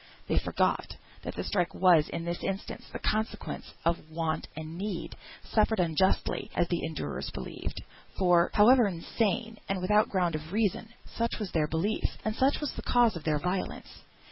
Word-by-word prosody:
They -, -, +2 dB
forgot -, -, 0 dB, 0.3 s
that -, -, -6 dB
the -, -, -3 dB
strike 180 Hz, -4 st, 0 dB
was 175 Hz, -5 st, +5 dB
in 165 Hz, -, -4 dB
this 170 Hz, 0 st, -3 dB
instance 195 Hz, +1 st, -4 dB
the -, -, -4 dB
consequence 220 Hz, +1 st, -2 dB
of 170 Hz, -1 st, 0 dB
want 160 Hz, 0 st, -2 dB
and 160 Hz, +1 st, -6 dB
need, 190 Hz, -1 st, -4 dB, 0.3 s
suffered 220 Hz, 0 st, +2 dB
unjustly, 175 Hz, +2 st, +1 dB
as 175 Hz, -, +2 dB
the 175 Hz, -, 0 dB
endurers 150 Hz, -, -4 dB
believed; -, -, -6 dB, 0.3 s
for, 180 Hz, -2 st, +4 dB
however 235 Hz, +2 st, +7 dB
insane, 220 Hz, +5 st, -1 dB
and 195 Hz, -1 st, 0 dB
without 210 Hz, +4 st, +3 dB
ground 180 Hz, -3 st, +1 dB
of 155 Hz, +1 st, -5 dB
reason, 220 Hz, 0 st, 0 dB, 0.2 s
such 230 Hz, 0 st, -2 dB
was 210 Hz, -4 st, -4 dB
their 155 Hz, -2 st, +1 dB
belief, 165 Hz, +8 st, -1 dB
and 215 Hz, 0 st, 0 dB
such 270 Hz, +4 st, +2 dB
was 295 Hz, -, -3 dB
the -, -, -6 dB
cause 240 Hz, -4 st, +3 dB
of 165 Hz, -, -7 dB
their 155 Hz, -2 st, +2 dB
violence. 180 Hz, +5 st, -3 dB
185 Hz, 170 wpm, -29 LUFS, 165-215 Hz, 0.3 s, however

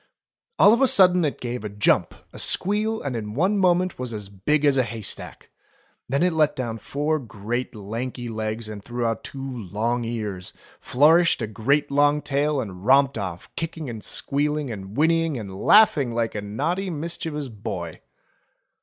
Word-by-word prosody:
All 205 Hz, -, +7 dB
of 235 Hz, -, +2 dB
a 270 Hz, -, +6 dB
sudden 180 Hz, -5 st, +5 dB
it 150 Hz, -, -1 dB
gave 120 Hz, -2 st, -4 dB
a 105 Hz, -, -4 dB
jump, 105 Hz, +1 st, +2 dB, 0.2 s
a -, -, -8 dB
squeal, 215 Hz, +3 st, +1 dB
and 135 Hz, -3 st, -3 dB
in 105 Hz, -1 st, -5 dB
one 190 Hz, +8 st, +2 dB
moment 180 Hz, -2 st, +2 dB
was 125 Hz, -3 st, -4 dB
as 105 Hz, -2 st, -6 dB
big 140 Hz, +11 st, 0 dB
as 140 Hz, -2 st, +4 dB
a -, -, +5 dB
haystack. 115 Hz, -3 st, -6 dB, 0.6 s
Then 140 Hz, +5 st, +1 dB
it 180 Hz, -1 st, +2 dB
let 155 Hz, -2 st, +2 dB
down 115 Hz, -3 st, -4 dB
four 150 Hz, +5 st, -1 dB
great 120 Hz, +1 st, -4 dB
lanky 120 Hz, +4 st, -5 dB
legs 110 Hz, 0 st, -4 dB
and 105 Hz, -2 st, -8 dB
threw 120 Hz, +1 st, -3 dB
out 115 Hz, -1 st, -1 dB
two 135 Hz, -, -8 dB, 0.2 s
long 115 Hz, +4 st, -2 dB
ears, 105 Hz, -6 st, -4 dB, 0.3 s
flourished 155 Hz, +1 st, +4 dB
a -, -, +1 dB
great 120 Hz, +8 st, 0 dB
long 145 Hz, +1 st, +3 dB
tail 145 Hz, +1 st, 0 dB
and 95 Hz, -6 st, -6 dB
romped 135 Hz, +1 st, +4 dB
off, 90 Hz, -3 st, -5 dB
kicking 165 Hz, -4 st, -4 dB
and 110 Hz, -3 st, -8 dB
squealing 145 Hz, +4 st, -1 dB
and 100 Hz, 0 st, -8 dB
whinnying 165 Hz, -1 st, +2 dB
and 100 Hz, -4 st, -7 dB
laughing 140 Hz, -, +4 dB
like 115 Hz, -1 st, 0 dB
a 105 Hz, -, -3 dB
naughty 170 Hz, -, -2 dB
mischievous 155 Hz, -3 st, -4 dB
boy 100 Hz, -7 st, -6 dB
125 Hz, 170 wpm, -24 LUFS, 110-155 Hz, 0.6 s, All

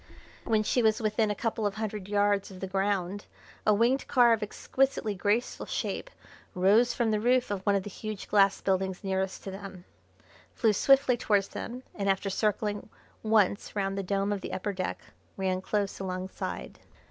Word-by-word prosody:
When 220 Hz, -2 st, +2 dB
she 245 Hz, -, +2 dB
was 220 Hz, -1 st, +3 dB
within 215 Hz, -1 st, +1 dB
a 210 Hz, -, -1 dB
couple 225 Hz, -1 st, -1 dB
of 200 Hz, -, -4 dB
hundred 215 Hz, -3 st, -4 dB
yards 205 Hz, -1 st, +1 dB
of 190 Hz, -1 st, -11 dB
the 190 Hz, -, -3 dB
ground 195 Hz, 0 st, -1 dB, 0.4 s
a -, -, +7 dB
winged 240 Hz, +5 st, +2 dB
car 240 Hz, -3 st, +5 dB
of 225 Hz, -, 0 dB
exquisitely 220 Hz, +1 st, 0 dB
graceful 205 Hz, +5 st, -1 dB
shape -, -, -3 dB, 0.5 s
rose 205 Hz, +7 st, +4 dB
from 235 Hz, -2 st, 0 dB
the 215 Hz, -, +1 dB
roof 245 Hz, +1 st, +2 dB
of 200 Hz, -2 st, -2 dB
one 200 Hz, -, +4 dB
of 195 Hz, -, 0 dB
the 205 Hz, -, -6 dB
huge 215 Hz, +1 st, -6 dB
glass 200 Hz, -1 st, +4 dB
buildings 190 Hz, 0 st, -1 dB
nearest 190 Hz, -1 st, -2 dB
to 195 Hz, -, -5 dB
them, 190 Hz, -2 st, -9 dB, 0.7 s
flew 220 Hz, -4 st, +3 dB
swiftly 270 Hz, +3 st, +4 dB
towards 205 Hz, -3 st, +1 dB
them, 250 Hz, +2 st, -6 dB
and 200 Hz, -1 st, -1 dB
after 195 Hz, +1 st, 0 dB
circling 210 Hz, +1 st, -1 dB, 0.3 s
once 215 Hz, -2 st, +2 dB
round 195 Hz, -1 st, -1 dB
the 195 Hz, -, -1 dB
dome 195 Hz, +1 st, 0 dB
of 200 Hz, -, -4 dB
the -, -, -6 dB
upper 205 Hz, +2 st, -2 dB
deck, 185 Hz, -1 st, -3 dB, 0.4 s
ran 185 Hz, -1 st, 0 dB
close 200 Hz, +1 st, -2 dB
alongside. 185 Hz, 0 st, -5 dB
205 Hz, 180 wpm, -29 LUFS, 195-220 Hz, 0.7 s, a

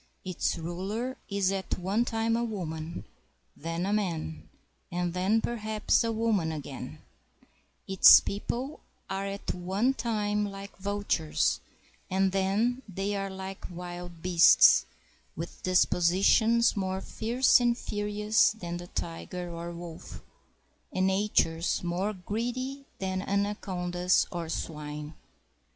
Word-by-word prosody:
Its 185 Hz, -1 st, -1 dB
ruler 195 Hz, +10 st, -3 dB
is 200 Hz, -2 st, +1 dB
at 195 Hz, -1 st, -2 dB
one 195 Hz, +6 st, +1 dB
time 225 Hz, -1 st, 0 dB
a 235 Hz, -, 0 dB
woman, 170 Hz, -7 st, -5 dB, 0.5 s
then 165 Hz, +3 st, -3 dB
a 200 Hz, -, 0 dB
man, 165 Hz, -6 st, -2 dB, 0.4 s
and 175 Hz, -1 st, -1 dB
then 190 Hz, +5 st, +2 dB
perhaps 220 Hz, -1 st, 0 dB
a 230 Hz, -, 0 dB
woman 220 Hz, -7 st, +1 dB
again; 145 Hz, -4 st, -7 dB, 0.9 s
its 190 Hz, -1 st, +9 dB
people 245 Hz, +8 st, -4 dB, 0.3 s
are 195 Hz, +1 st, -2 dB
at 200 Hz, 0 st, -4 dB
one 190 Hz, +8 st, 0 dB
time 210 Hz, -4 st, -1 dB
like 200 Hz, -1 st, -6 dB
vultures, 200 Hz, -, 0 dB, 0.5 s
and 190 Hz, 0 st, +2 dB
then 200 Hz, +6 st, +1 dB
they 195 Hz, +2 st, -2 dB
are 195 Hz, 0 st, -2 dB
Hke 190 Hz, 0 st, -7 dB
wild 175 Hz, -1 st, -8 dB
beasts, 175 Hz, -2 st, +7 dB, 0.5 s
with 165 Hz, +2 st, -7 dB
dispositions 190 Hz, +6 st, +3 dB
more 190 Hz, -1 st, -1 dB
fierce 240 Hz, +7 st, +3 dB
and 240 Hz, -1 st, +2 dB
furious 210 Hz, 0 st, +1 dB
than 175 Hz, -5 st, -5 dB
the 175 Hz, 0 st, -8 dB
tiger 175 Hz, +1 st, -5 dB
or 170 Hz, 0 st, -5 dB
wolf, 170 Hz, -1 st, -9 dB, 0.7 s
and 185 Hz, 0 st, +1 dB
natures 190 Hz, -5 st, +1 dB
more 180 Hz, +4 st, -1 dB
greedy 245 Hz, +8 st, -4 dB
than 190 Hz, -1 st, -2 dB
anacondas 185 Hz, -3 st, 0 dB
or 170 Hz, -2 st, -4 dB
swine. 150 Hz, -1 st, -5 dB
190 Hz, 120 wpm, -29 LUFS, 175-210 Hz, 0.9 s, its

